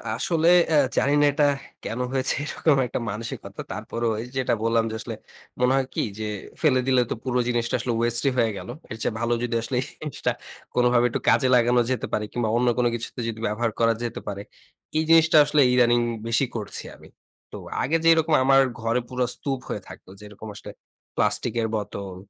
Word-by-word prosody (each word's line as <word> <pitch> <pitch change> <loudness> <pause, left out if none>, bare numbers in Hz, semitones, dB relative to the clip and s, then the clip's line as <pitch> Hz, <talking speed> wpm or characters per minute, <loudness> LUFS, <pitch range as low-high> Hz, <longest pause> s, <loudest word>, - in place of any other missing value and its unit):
আসলে 165 +5 0 0.2
অ্যা 160 - +2 0.2
জানি 140 - +3
না - - +5
এটা 145 +1 +2 0.4
কেনো 120 +3 -3
হয়েছে, 130 0 +1
এরকম 150 0 +1
একটা - - -3
মানসিকতা? 105 -2 -6
তারপরেও 115 +3 -2
এই 120 - -7
যেটা 130 -2 +1
বললাম 115 0 +2
যে, - - -4
আসলে, - - -6 0.4
মনে 125 +1 +3
হয় 135 -1 +1
কি? - - -1 0.2
যে, 110 - -3 0.4
ফেলে 140 -5 +4
দিলে 130 -1 +4
তো - - 0
পুরো 125 -1 0
জিনিসটা 120 0 0
আসলে 120 0 -2
ওয়েস্ট 120 0 +1
হয়ে 115 -2 +2
গেল। - - -8 0.2
এর 110 - -5
চেয়ে - - -1
ভালো 120 +1 0
যদি 120 -1 -2
আসলে 120 +3 -4
এই - - -4 0.2
জিনিসটা 150 -3 -2 0.4
কোনোভাবে 125 -1 +3
একটু - - -2
কাজে 130 - +4
লাগানো 120 0 +4
যেতে 130 - -2
পারে, 105 - 0
কিংবা 120 -3 -1
অন্য 125 +1 +1
কোনো 120 -1 +3
কিছুতে 120 +1 -6
যদি 115 -1 -4
ব্যবহার 110 +2 -1
করা 115 0 +4
যেতে 120 - -4
পারে। 100 -1 -4 0.6
এই 160 - +2
জিনিসটা 160 -1 +6
আসলে 145 0 +3
ইদানিং 120 -1 +4 0.3
বেশি 115 +4 +2
করছি 105 -3 -4
আমি। - - -16 0.4
তো - - -7 0.3
আগে 160 +5 +2
যেরকম 160 -1 +4
আমার 135 +1 +5 0.2
ঘরে 115 +2 +1
পুরো 125 -1 -1
স্তূপ 135 -2 -3
হয়ে - - -3
থাকত, - - -13
যেরকম 105 +1 -11
আসলে - - -9 0.4
প্লাস্টিকের 115 -1 0
বোতল, 100 -2 -5
120 Hz, 190 wpm, -24 LUFS, 115-130 Hz, 0.6 s, জিনিসটা